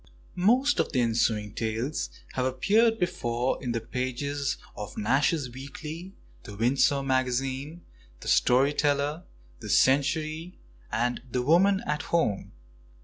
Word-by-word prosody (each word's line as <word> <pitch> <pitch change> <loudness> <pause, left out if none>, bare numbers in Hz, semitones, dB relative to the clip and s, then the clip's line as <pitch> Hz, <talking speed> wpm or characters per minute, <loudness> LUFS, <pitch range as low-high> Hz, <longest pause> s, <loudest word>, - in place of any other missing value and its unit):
Most 250 +10 +3
of - - +1
the 125 - +2
ensuing 115 -3 +1
tales 115 +6 -2 0.2
have 130 - -1
appeared 215 - +3
before 130 - -1
in 125 - -2
the 115 - -1
pages 130 +4 -3 0.2
of 105 - -7
Nash's 135 +4 +1
Weekly, 150 +8 -8 0.3
The 100 - -10
Windsor 135 +5 +2
Magazine, 135 +4 -1 0.4
The - - -9
Story 135 +4 +4
Teller, 145 +3 0 0.3
The - - -8
Century, 155 +5 +1 0.3
and 120 +2 0
The 125 +1 0
Woman 190 +7 +4
at 150 0 -1
Home. 160 - 0
135 Hz, 125 wpm, -27 LUFS, 125-160 Hz, 0.4 s, Story